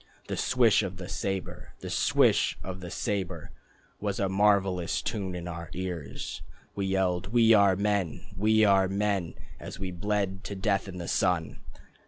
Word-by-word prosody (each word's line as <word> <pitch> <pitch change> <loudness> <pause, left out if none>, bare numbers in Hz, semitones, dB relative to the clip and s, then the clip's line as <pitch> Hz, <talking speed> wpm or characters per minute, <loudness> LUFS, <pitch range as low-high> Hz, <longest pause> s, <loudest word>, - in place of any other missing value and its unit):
The - - -1
swish 120 -5 +3
of 95 -2 -4
the 90 -1 -7
sabre, 95 -1 -4
The - - -6
swish - - +3
of 95 0 -6
the 90 -1 -7
sabre, 95 +1 -3 0.5
Was 100 -1 -2
a 100 - +1
marvellous 95 -3 +2
tune 95 -4 -3
in 90 -1 -5
our 85 -1 -6
ears. 90 -5 -5 0.3
We 100 -1 -2
yelled 95 -1 0
"We 115 +1 +5
are 100 -3 +5
men, 100 -4 -1
We 110 +3 +4
are 95 -2 +4
men." 100 -2 -1 0.2
As - - -8
we 95 -1 -4
bled 100 +1 -2
to 100 - -5
death 100 0 0
in 95 -2 -7
the 85 -1 -5
sun.... 90 -4 0
95 Hz, 165 wpm, -28 LUFS, 90-100 Hz, 0.5 s, We